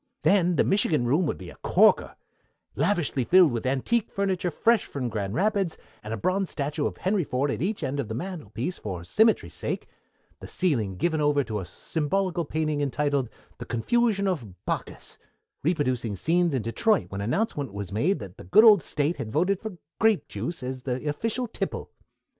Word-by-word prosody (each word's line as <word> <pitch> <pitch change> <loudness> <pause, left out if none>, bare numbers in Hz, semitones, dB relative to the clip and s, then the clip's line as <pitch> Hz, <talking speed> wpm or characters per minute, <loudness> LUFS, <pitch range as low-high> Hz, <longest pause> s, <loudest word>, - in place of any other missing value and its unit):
Then 180 -3 +4
the - - +4
Michigan 165 -9 +2
room 150 +8 +2
would - - -2
be 90 -2 -9
a - - -15
corker, - - +3 0.6
lavishly 175 -9 +1
filled 180 +2 +6
with 120 +1 -2
antique 170 - +1
furniture 190 -3 -1
fresh 225 +6 +2
from 130 -4 -4
Grand 100 -2 -3
Rapids, 195 -3 +1 0.2
and 105 - -7
a 115 - -2
bronze 185 - 0
statuette 145 +1 -2
of - - -7
Henry 190 0 +1
Ford 140 +1 -1
at - - -3
each 195 +1 -1
end 140 +1 -2
of 135 - -2
the 110 - -4
mantelpiece 160 - -5
for 90 -5 -5
symmetry's 220 - +2
sake, - - -4 0.5
the - - -9
ceiling 115 - 0
given 160 - 0
over 145 -1 +3
to 110 -3 -3
a 95 - -5
symbolical 170 - -1
painting 155 -1 -1
entitled 140 -2 0 0.3
The - - -6
Confusion 200 - +1
of 120 - -4
Bacchus, - - -4 0.4
reproducing 130 - 0
scenes 170 - +1
in 125 - -1
Detroit 205 - +1
when 100 0 -4
announcement 140 - -1
was 100 -2 -6
made 150 - +1
that 100 -5 -9
the - - -10
good 155 - +6
old 210 -5 +8
State 150 +4 -1
had 110 - -5
voted 180 - +1
for 220 -5 -7 0.2
grape 220 -2 +3
juice 170 -6 -5
as 130 0 -4
the 130 +2 -3
official 230 +11 -1
tipple. - - -4
150 Hz, 180 wpm, -26 LUFS, 125-190 Hz, 0.6 s, old